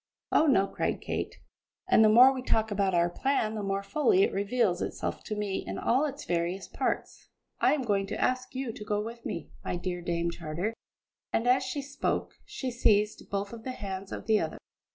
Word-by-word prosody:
"Oh, 315 - +4
no!" 195 -9 +5
cried 195 - -2
Kate; - - -3 0.5
"and 295 -12 +6
the 215 - +7
more 250 +5 +8
we 260 - -4
talk 220 -3 +1
about 195 -2 +1
our 170 0 +4
plan 220 +3 0
the 215 - -3
more 195 0 -1
fully 370 - +3
it - - +1
reveals 200 -1 +1
itself - - -3
to 215 - -3
me 205 -2 -2
in - - -5
all 260 +6 +2
its 285 0 -5
various 175 +2 -1
parts. - - -3 0.3
I - - +4
am 280 - -2
going 200 -4 +1
to - - -4
ask 255 0 0
you 260 -2 -2
to 210 - -8
go 210 0 -1
with 230 +2 -6
me, 170 - -5
my - - -2
dear 175 0 -3
Dame 170 0 -1
Charter," 170 +6 -3 0.6
and 230 - 0
as 255 +1 +4
she 265 +2 -3
spoke 280 0 -2
she 260 -2 -4
seized 215 -3 +2
both 200 +2 -2
of 225 -1 -9
the 255 - -4
hands 195 -3 -6
of - - -6
the 220 -1 +4
other. 160 - -3
215 Hz, 210 wpm, -29 LUFS, 195-255 Hz, 0.6 s, more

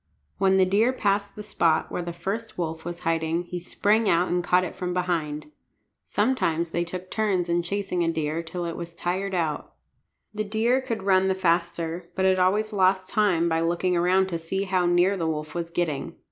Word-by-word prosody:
When 190 0 +4
the 190 - +5
deer 210 +6 +3
passed 200 -3 0
the 210 - -7
spot 170 -6 +1
where - - -2
the 170 0 -4
first 195 +7 -5
wolf 160 -2 -4
was 175 0 -6
hiding 165 +1 0
he 175 0 -5
sprang 205 +5 +1
out 170 +2 +3
and 175 0 0
caught 180 +1 +3
it 185 - -5
from 180 -1 -3
behind. 170 - -2 0.5
Sometimes 170 -8 0
they 170 - 0
took 180 +2 -7
turns 195 -5 0
in 170 0 +2
chasing 180 0 -2
a 165 - +1
deer 160 0 -2
till 170 +1 -5
it 170 - -4
was 170 0 -7
tired 190 +3 -2
out. 160 -4 -2 0.6
The 215 0 -2
deer 225 +5 +1
could 230 -6 -4
run 190 -1 +3
the 190 - +1
faster, 170 -1 -1
but 190 - +1
it 190 0 +3
always 210 +4 +2
lost 190 -1 +2
time 185 -6 +2
by 165 -1 +1
looking 175 +2 +1
around 180 +2 +3
to 170 -2 -3
see 190 +4 -2
how 185 -2 +1
near 175 +3 +3
the 165 -4 -2
wolf 155 -1 -3
was 170 -1 -3
getting. 170 -5 -2
180 Hz, 200 wpm, -25 LUFS, 170-195 Hz, 0.6 s, the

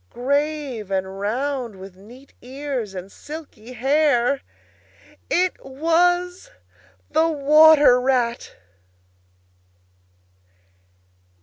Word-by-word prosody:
Grave 280 -4 -2
and 190 0 -3
round, 245 +2 -3
with 190 0 -12
neat 240 +8 -17
ears 255 -5 -5
and 185 +1 -8
silky 285 -6 -11
hair. 275 0 +1 0.9
It 365 +1 0
was 350 +6 0 0.6
the 325 +1 +2
Water 300 -3 +5
Rat! 250 -2 -1
270 Hz, 75 wpm, -21 LUFS, 235-305 Hz, 0.9 s, Water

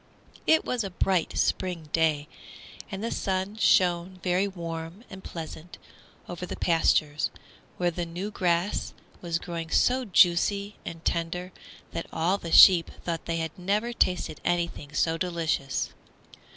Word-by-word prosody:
IT 320 - +4
was 245 -3 -1
a 195 - -4
bright 180 -1 0
spring 175 -4 0
day, 155 -3 +2 0.6
and 195 +1 -5
the 230 - -2
sun 190 +2 -2
shone 180 -3 +2
very 185 +2 +2
warm 170 +1 -6
and 190 0 -9
pleasant 165 +1 -8 0.5
over 175 0 -7
the 180 - -4
pastures, 155 -3 +2 0.5
where 175 -1 +1
the 175 +1 -3
new 175 +5 -5
grass 175 0 0 0.3
was 170 -2 -1
growing 170 -1 -6
so 255 +8 +3
juicy 200 0 +3
and 165 0 -8
tender 175 +2 -2 0.4
that 165 - -4
all 175 +5 +1
the 165 - -6
sheep 175 -2 +8 0.2
thought 170 -1 -3
they 165 0 -1
had 160 -1 -2
never 210 +6 0
tasted 180 -7 0
anything 170 -4 -1
so 165 +2 0
delicious. 165 -6 -1
175 Hz, 140 wpm, -27 LUFS, 165-190 Hz, 0.6 s, sheep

